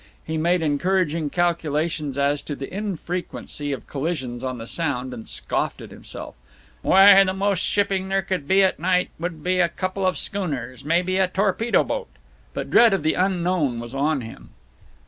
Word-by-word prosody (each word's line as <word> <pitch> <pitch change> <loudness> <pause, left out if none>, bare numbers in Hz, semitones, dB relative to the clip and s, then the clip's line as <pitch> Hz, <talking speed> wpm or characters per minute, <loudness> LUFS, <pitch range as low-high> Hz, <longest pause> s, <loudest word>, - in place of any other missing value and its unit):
He 160 - -3
made 170 +2 +1
encouraging 160 0 +1
calculations 160 -4 -1
as 140 +1 +1
to 145 - -5
the 135 +3 -7
infrequency 180 -6 -4
of 130 -5 -5
collisions 135 -5 -4
on 130 -1 -3
the 115 - -7
Sound, 130 -3 -2
and 115 -2 -8
scoffed - - -2
at - - -10
himself, - - -9 0.5
"Why, 195 - +8
the 190 -1 -1
most 200 -1 +1
shipping 195 -2 0
there 195 0 +1
could 185 -6 -3
be 195 +3 +5
at 190 - +1
night 180 +2 +1
would 165 -2 -5
be 180 0 +1
a 170 -1 +4
couple 185 +2 -3
of 185 -1 +1
schooners, 140 - -3
maybe 175 +5 +1
a 190 -1 +3
torpedo 200 +5 +1
boat." - - -4 0.5
But - - -4
dread 235 -3 +6
of 190 -6 0
the 160 - +2
unknown 180 -8 0
was 120 +1 -7
on 140 +1 0
him. 115 -1 -10
170 Hz, 175 wpm, -23 LUFS, 145-190 Hz, 0.5 s, Why